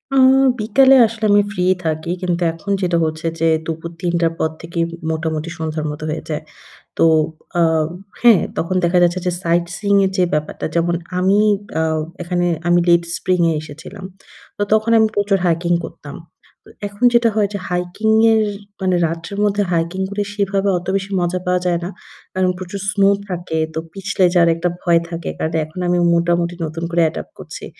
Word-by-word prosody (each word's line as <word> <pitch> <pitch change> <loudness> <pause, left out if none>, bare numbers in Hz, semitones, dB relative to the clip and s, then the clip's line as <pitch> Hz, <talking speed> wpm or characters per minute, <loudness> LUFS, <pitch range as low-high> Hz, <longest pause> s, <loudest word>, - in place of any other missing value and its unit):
আ - - +4 0.4
বিকালে 260 +6 +5
আসলে 220 0 -4
আমি 205 - +6
ফ্রি 180 -4 -2 0.2
থাকি। 160 +1 -2
কিন্তু 180 -1 -1
এখন 165 +5 -6
যেটা 175 -2 +1
হচ্ছে 155 +1 -3
যে 165 - +2 0.2
দুপুর 165 +1 -5
৩:০০ 170 -2 +1
পর 160 - +1
থেকেই 170 0 -2 0.3
মোটামুটি 160 0 -3
সন্ধ্যার 155 -1 -3
মত 150 +1 -8
হয়ে 155 - -4
যায়। 155 0 -3 0.6
তো - - +4 0.6
আ - - +5 0.6
হ্যাঁ 235 -6 +6 0.2
তখন 175 +3 -1
দেখা 175 +1 +3
যাচ্ছে 175 +1 +2
যে 180 - +1
সাইটসিং 175 +4 0
এর 190 - +1
যে 185 - +3
ব্যাপারটা 150 0 -3
যেমন 170 0 +1 0.2
আমি 190 +2 +3 0.4
আউ 160 -1 0 0.2
এখানে 175 0 -1 0.2
আমি 175 - +4
লেট 170 0 +5
স্প্রিং 185 -1 0
এ - - +1
এসেছিলাম। 165 +6 -10 0.5
তো 205 - 0
তখন 215 +1 +3
আমি 220 - +4
প্রচুর 205 -1 +1
হাইকিং 170 +1 +1
করতাম। - - -9 0.5
তো - - -19 0.2
এখন 205 +4 -5
যেটা 235 -1 +5
হয় 205 -2 +2
যে 200 - -3
হাইকিং 180 +4 -2 0.2
এর 220 -1 +3 0.4
মানে 185 -1 +1
রাত্রের 165 +5 -5
মধ্যে 205 0 +1
হাইকিং 170 +2 -1
করে 205 +1 -2
সেভাবে 200 -1 0
অত 175 - -12
বেশি 195 0 -4
মজা 175 +1 0
পাওয়া 180 0 +1
যায় 175 -1 +1
না। 175 - -4 0.4
কারণ 185 -1 +2
প্রচুর 185 +2 -6
স্নো 200 -1 +3 0.2
থাকে। 175 -3 -3 0.2
তো - - -2
পিছলে 195 -1 -1
যার 170 -2 +5
একটা 170 +2 -1
ভয় 170 -2 +3
থাকে। 170 0 -5
কারণ 160 +1 -2
এখন 155 +4 -12
আমি 175 0 +2 0.2
মোটামুটি 170 0 +1
নতুন 160 +1 -4
করে 170 0 +2
অ্যাডপ্ট 160 - -3
করছি। - - -9
175 Hz, 180 wpm, -19 LUFS, 165-195 Hz, 0.6 s, আমি